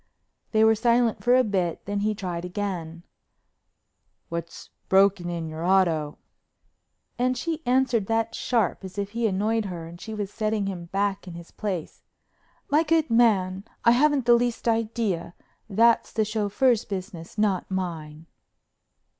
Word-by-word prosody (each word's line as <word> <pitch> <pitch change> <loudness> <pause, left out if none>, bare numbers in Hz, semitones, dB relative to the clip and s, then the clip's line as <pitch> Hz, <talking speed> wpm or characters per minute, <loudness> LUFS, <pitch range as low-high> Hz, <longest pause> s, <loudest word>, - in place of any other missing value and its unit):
They 220 -1 +4
were 220 0 +6
silent 235 +1 +2
for 245 +1 +5
a 255 - +5
bit, 185 -6 -1
then 205 0 -2
he 210 +1 0
tried 180 -4 -4
again: 180 -3 -4 1.3
"What's 170 0 -6 0.2
broke 195 0 +4
in 170 -2 -4
your 160 +1 -6
auto?" 170 -5 +2 1.0
And 255 +1 +1
she 325 +3 -3
answered 250 -5 +2
that 225 0 0
sharp 225 -6 0
as 190 +1 -9
if 200 0 -3
he 230 0 0
annoyed 215 +3 0
her 175 -4 -6
and 170 +1 -11
she 220 -1 -6
was 205 -2 -4
setting 215 -2 -1
him 185 -3 -5
back 195 +2 -2
in 175 - -8
his 170 0 -11
place: 190 -7 -5 0.7
"My 300 +2 +3
good 320 -3 +1
man, 195 -5 +3 0.2
I 235 - +7
haven't 280 +1 +3
the 240 - +6
least 240 0 0
idea. 225 -6 -1 0.3
That's 230 +3 +3
the 220 -1 0
chauffeur's 215 +3 +1
business, 185 -3 -7
not 205 -4 0
mine." 165 -5 -4
205 Hz, 150 wpm, -25 LUFS, 180-230 Hz, 1.3 s, I